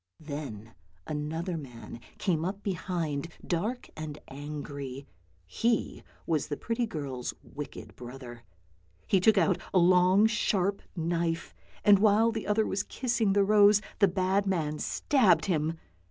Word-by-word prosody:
Then 140 -8 -7 0.3
another 160 +4 -3
man 125 -5 -9 0.2
came 165 -5 0
up 195 +3 -4
behind, 170 -6 -2 0.2
dark 210 +9 -2
and 155 -1 -6
angry; 140 -1 -6 0.4
he 225 - 0 0.2
was 155 -3 0
the 145 - -3
pretty 230 0 -1
girl's 135 - -4
wicked 145 0 -9
brother. 120 -1 -9 0.6
He 195 - +3
took 210 +3 +4
out 190 -2 +3
a - - +2
long 180 +3 +5
sharp 200 -3 +1
knife, 170 -1 -1 0.3
and 205 -2 +7
while 220 +2 +4
the 225 -1 -4
other 210 +1 +2
was 195 - -1
kissing 235 -3 0
the 200 0 +4
rose 205 0 +6 0.2
the 200 - +6
bad 190 +2 +1
man 155 -5 -1
stabbed 210 - +3
him. 160 -3 0
175 Hz, 135 wpm, -29 LUFS, 150-205 Hz, 0.6 s, and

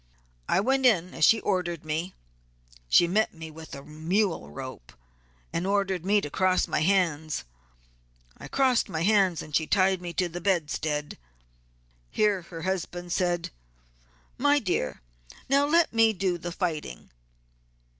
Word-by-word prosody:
I 190 - +3
went 265 +3 +3
in 180 -6 +2
as 155 - +3
she 225 - +5
ordered 175 -5 -2
me; 160 +4 -3 0.7
she 175 - +6
met 210 +3 +1
me 160 -1 -9
with 160 +1 -10
a 140 - -9
mule 165 - -1
rope, 65 -4 -9 0.6
and 170 +3 -1
ordered 195 -3 0
me 205 +2 +3
to 145 - -5
cross 185 +2 +2
my - - 0
hands. 160 -3 +1 0.9
I - - -10
crossed 260 -3 +2
my 160 0 -2
hands 190 -4 +3
and 150 - -6
she 160 0 +1
tied 190 -2 +2
me 175 -1 -5
to 180 - 0
the 175 +1 -7
bedstead. 155 -4 -1 0.9
Here 210 -3 +1
her 165 -1 -9
husband 175 -1 -3
said, 175 -2 0 0.9
'my 290 +2 +4
dear, 180 - -2 0.4
now 280 +2 +3
let 335 -1 +3
me 225 -1 +4
do 180 -2 -1
the 175 +1 -5
fighting.' 160 - -4
180 Hz, 145 wpm, -27 LUFS, 160-200 Hz, 0.9 s, she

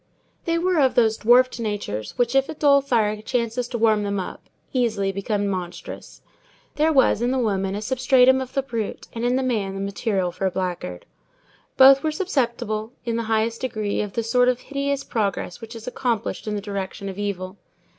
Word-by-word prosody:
They 335 0 +1
were 355 0 +1
of 265 -3 +3
those 225 -2 +3
dwarfed 245 +2 +4
natures 205 - -4
which, 245 0 +1
if 270 0 +2
a 315 - -5
dull 280 -2 +4
fire 215 -5 0
chances 235 +1 -1
to 240 - -4
warm 220 -2 +3
them 200 -1 -1
up, 185 - -6 0.3
easily 220 -6 +1
become 200 +1 -1
monstrous. 190 - -6 0.5
There 310 +2 +2
was 265 -6 +3
in 240 - +1
the 265 - 0
woman 195 -5 0
a 210 - -4
substratum 260 +1 +4
of 260 - -7
the 275 - +1
brute, 230 -6 -4
and 230 - -4
in 245 +1 +2
the 265 - +1
man 210 -6 -1
the - - -4
material 195 -2 -1
for 190 +2 -2
a - - +2
blackguard. 175 - -4 0.7
Both 270 +1 +8
were 315 - 0
susceptible, 235 - -2
in 230 -1 -1
the 230 - 0
highest 225 +1 0
degree, 215 -5 -2
of 210 -2 -5
the 230 - -1
sort 245 +2 +3
of 250 -1 0
hideous 280 0 -2
progress 200 -2 -2
which 225 +1 -9
is 225 0 -9
accomplished 240 -4 -2
in 210 - -1
the 205 - -3
direction 200 -1 -5
of 195 +1 -6
evil. 190 -2 -4
230 Hz, 195 wpm, -23 LUFS, 200-255 Hz, 0.7 s, Both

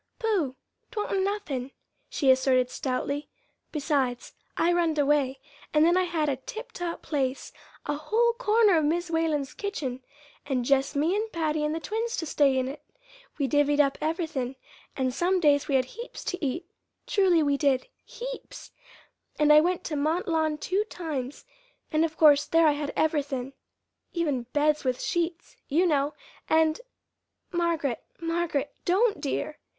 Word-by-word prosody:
"Pooh! 395 - 0 0.3
'twa'n't 420 -4 -1
nothin'," 380 -11 -2 0.4
she 270 -3 +3
asserted 255 -1 +3
stoutly; 280 +2 -2 0.4
"besides, 275 -5 -1 0.2
I 345 +1 +3
runned 335 -3 +1
away, 280 -2 +2 0.4
and 305 +1 +6
then 345 +1 +4
I 370 0 +3
had 330 -3 -1
a 275 -3 0
tiptop 350 - -6
place 270 -3 -2 0.3
a 295 - -1
whole 445 +11 +1
corner 445 -5 +4
of - - 0
Mis' 340 +3 0
Whalen's 315 -4 0
kitchen, 275 -11 -4 0.4
and 260 -4 -1
jest 275 +1 +2
me 315 +6 +2
and 435 +1 -2
Patty 310 -2 -1
and 300 +1 0
the - - -2
twins 450 +6 -3
to 325 - -2
stay 280 -3 +3
in 260 0 0
it. 275 +3 -7 0.6
We 280 -3 0
divvied 290 0 +2
up 275 -2 +4
everythin', 310 -5 -2 0.4
and 260 -2 0
some 360 +7 +1
days 290 -4 +3
we 275 - +1
had 260 -1 +3
heaps 470 - -9
to 365 -2 -4
eat 290 +5 -2 0.4
truly 365 -5 +3
we 285 -1 +2
did 275 -3 +1 0.2
heaps! - - -8 0.7
And 300 0 +5
I 300 - +8
went 355 +2 0
to 310 - -3
Mont 310 +5 0
Lawn 315 -2 +1
two 380 +6 0
times, 295 -9 -5 0.5
and 310 +1 +3
of 320 -1 -2
course 295 -2 +6
there 330 0 +4
I - - +6
had 290 0 -3
everythin', 280 -4 0 0.6
even 290 -9 -1
beds 300 0 +2
with 255 -2 0
sheets, 345 0 -2
you 330 +6 +2
know; 290 -3 +1 0.3
and 320 +3 +3 0.4
" - - -53
"Margaret, 335 -7 -1 0.2
Margaret, 330 -4 -1
don't, 415 +4 +2
dear!" 300 +1 -3
305 Hz, 160 wpm, -27 LUFS, 280-345 Hz, 0.7 s, I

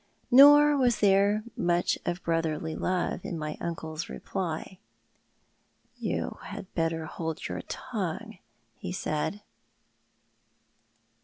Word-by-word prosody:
Nor 290 +3 +8
was 245 -4 +2
there 200 +1 +4
much 175 0 +1
of 175 +2 -2
brotherly 160 -1 -1
love 180 -1 -1
in 170 - -4
my 150 -1 -4
uncle's 160 -1 -4
reply. 185 0 -4 0.6
'' - - -42
You - - -3
had 200 -2 -9
better 165 -1 -1
hold 160 0 -4
your 90 0 -4
tongue," 220 - -5 0.3
he - - -7
said. 180 +2 -2
175 Hz, 105 wpm, -28 LUFS, 160-210 Hz, 0.6 s, Nor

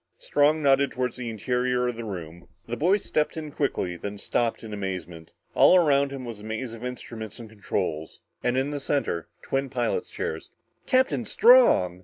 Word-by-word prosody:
Strong 150 +2 +2
nodded 140 0 +4
toward 125 -1 -2
the 125 -2 -5
interior 125 +3 0
of 125 - -2
the 115 - -6
room. 85 -5 -7 0.2
The 120 0 -4
boy 180 - +3
stepped 155 -6 -1
in 155 -2 -5
quickly, 95 - -2
then 100 +4 -6
stopped 115 +3 -1
in 110 -1 -7
amazement. 90 -5 -6 0.2
All - - +6
around 140 -5 +3
him 135 -2 -7
was 115 -3 -7
a - - -12
maze 110 +2 -4
of 115 +1 -9
instruments 115 -3 -7
and 115 - -9
controls. 95 -7 -4 0.2
And 125 +1 +1
in 135 +2 0
the 145 - -3
center, 135 - -1 0.2
twin 135 0 -1
pilot's 120 -3 -1
chairs. 80 - -5 0.4
"Captain 260 -1 +2
Strong!" 225 - +5
125 Hz, 180 wpm, -26 LUFS, 105-140 Hz, 0.4 s, All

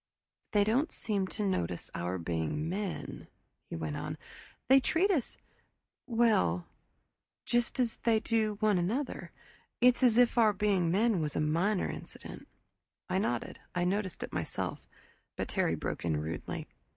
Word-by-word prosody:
"They 205 -1 +5
don't 245 +10 +1
seem 200 -3 -1
to 210 +2 -3
notice 90 - -2
our 90 +2 -2
being 85 - -2
men," 195 +2 -4 0.4
he - - -4
went 80 -2 -3
on. - - -4 0.5
"They 265 +2 +8
treat 340 +9 +2
us 290 - -1 0.7
well 215 - +3 0.8
just 240 +2 +1
as 240 -3 +1
they 225 -2 +2
do 220 -1 +1
one 210 -4 +4
another. 230 +11 -2 0.5
It's 250 +1 +5
as 240 -3 +5
if 245 0 +5
our 215 -2 +6
being 195 -4 +2
men 205 +1 +3
was 150 -2 -2
a - - +1
minor 170 +7 +1
incident." - - -8 0.6
I 185 +1 +2
nodded. 120 - -2 0.2
I'd 175 0 +2
noticed 195 -2 -2
it - - -7
myself. - - -3 0.5
But - - -3
Terry - - +1
broke - - -4
in 80 -3 +1
rudely. 80 +2 -4
205 Hz, 150 wpm, -31 LUFS, 150-230 Hz, 0.8 s, They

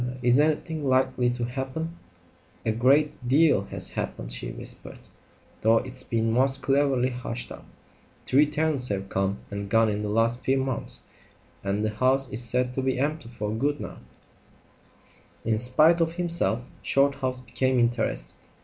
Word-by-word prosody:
"Er 125 +1 -3
is 125 +2 +5
anything 155 +1 0
likely 130 -2 +2
to 120 -1 -2
happen?" 135 +7 -4 0.7
"A 110 - +2
great 130 +3 +2
deal 140 -6 +4
has - - -3
happened," - - -4
she - - -4
whispered, - - -7 0.6
"though 115 +1 +5
it's 130 +2 -3
been 115 -1 0
most 130 +3 +1
cleverly 135 -2 +2
hushed 120 -1 -5
up. - - -10 0.6
Three 145 +3 +4
tenants 150 -4 0
have 95 -2 -3
come 95 +1 0
and 100 0 -5
gone 115 +1 +4
in 105 0 -2
the 105 - -3
last 115 +3 +1
few 135 +1 +2
months, 130 -2 -3 0.6
and 100 +2 -1
the 110 - 0
house 130 +5 +2
is 115 +4 0
said 125 +1 +1
to 130 - -1
be 130 -1 0
empty 145 -1 -2
for 105 -3 -4
good 145 +7 0
now." - - -7 1.5
In 110 -1 +2
spite 155 +8 +4
of 165 0 +1
himself 170 -9 +1 0.2
Shorthouse 135 -2 +1
became 130 +1 0
interested. 120 - -1
125 Hz, 160 wpm, -26 LUFS, 115-140 Hz, 1.5 s, is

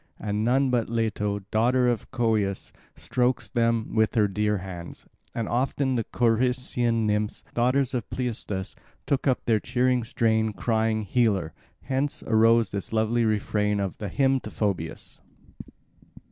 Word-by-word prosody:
And 105 0 -2
none 130 +3 +2
but 120 -3 0
Leto, 105 -3 -1
daughter 125 +3 +3
of 120 -2 -1
Coeus, 110 -6 -1 0.2
strokes 125 0 -1
them 115 -2 0
with 110 +1 +2
her 105 -3 +4
dear 105 +1 0
hands. 90 -2 -8 0.3
And 115 -2 -2
often 130 +2 0
the 115 -3 -1
Corycian 120 -1 +1
nymphs, 105 0 -1
daughters 130 +3 +1
of 120 -5 -3
Pleistus, 110 -6 -4 0.3
took 140 0 0
up 130 - +1
the 110 -2 +3
cheering 125 +1 +1
strain 110 -2 +1
crying 110 0 0
"Healer"; 100 -7 +1 0.3
hence 135 +3 -2
arose 115 -1 +4
this 100 - -4
lovely 110 +1 +1
refrain 105 -1 0
of 100 -2 -3
the 105 - -4
hymn 135 +4 +2
to - - -8
Phoebus. 90 -6 -3
115 Hz, 140 wpm, -26 LUFS, 105-125 Hz, 0.3 s, her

